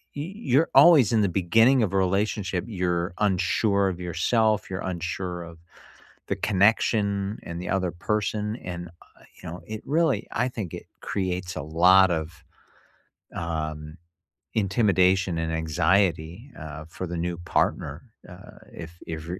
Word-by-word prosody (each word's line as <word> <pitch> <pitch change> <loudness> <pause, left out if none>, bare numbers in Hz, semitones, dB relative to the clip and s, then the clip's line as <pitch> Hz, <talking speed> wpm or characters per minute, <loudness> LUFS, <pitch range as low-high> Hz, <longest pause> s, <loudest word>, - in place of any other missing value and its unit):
y 155 +7 -5
you're 160 - +1
always, 155 - +7
in 110 - +4
the 100 - +2
beginning 115 +8 +4
of 95 -2 -1
a - - +2
relationship, 95 -1 0
you're 90 -4 -1
unsure 100 0 +2
of 90 -1 -6
yourself, 105 +5 +1
you're 95 0 -4
unsure 90 0 -4
of 85 -1 -12 0.7
the - - -1
connection, 100 0 +1
and 85 +1 -6
the - - -6
other 95 -2 0
person. 105 +3 -2
And, 85 -3 -7
uh, 85 +1 -21 0.2
you - - -7
know, 90 +2 -8
it 110 0 -6
really 150 -6 +1
I 125 +3 0
think 105 -9 -6
it - - -7 0.2
creates 90 -2 -3
a - - -3
lot 90 +4 +5
of, 80 -1 -4 0.9
um, 80 -1 -4 0.6
intimidation 95 -4 +2
and 80 0 -2
anxiety, 85 - 0
uh, 80 0 -8
for 90 +2 -6
the 85 - -5
new 85 0 -2
partner, 85 - -1 0.3
uh, - - -13
if 80 -1 -8 0.2
if 80 -1 -5
you're 90 +1 -5
95 Hz, 150 wpm, -25 LUFS, 85-105 Hz, 0.9 s, always